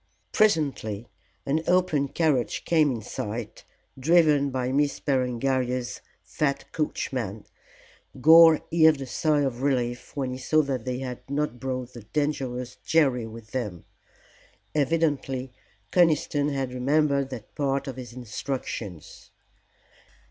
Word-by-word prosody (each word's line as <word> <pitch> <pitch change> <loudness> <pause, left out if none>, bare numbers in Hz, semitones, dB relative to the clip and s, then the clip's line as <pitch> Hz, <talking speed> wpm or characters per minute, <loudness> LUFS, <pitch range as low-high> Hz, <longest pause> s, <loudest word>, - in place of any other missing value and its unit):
Presently 140 - +1 0.4
an 150 +3 +1
open 180 -6 +2
carriage 140 -5 0
came 160 -3 +3
in 115 -5 -3
sight 105 +3 -6 0.3
driven 150 -1 +4
by 130 -1 -2
Miss 145 +1 +1
Berengaria's 125 -1 -1 0.2
fat 140 -2 -2
coachman. 120 -8 -3 0.7
Gore 160 +2 +8
heaved 160 -3 +5
a - - -3
sigh 150 +3 +1
of 130 -3 -2
relief 125 -3 -1
when 135 -3 -2
he 130 - -5
saw 155 +3 +2
that 130 -5 -3
they 125 -1 -2
had 125 -2 -5
not 140 -3 -2
brought 130 -1 -4
the 120 - -9
dangerous 125 -1 -3
Jerry 135 -8 +2
with 110 0 -11
them. 105 -10 -4 0.9
Evidently 145 -4 0 0.4
Conniston 155 -4 +3
had 135 -3 -2
remembered 140 +1 +1
that 120 -5 -9
part 140 -1 -1
of 135 - -5
his 125 -2 -8
instructions. 120 - -6
135 Hz, 120 wpm, -26 LUFS, 125-150 Hz, 0.9 s, Gore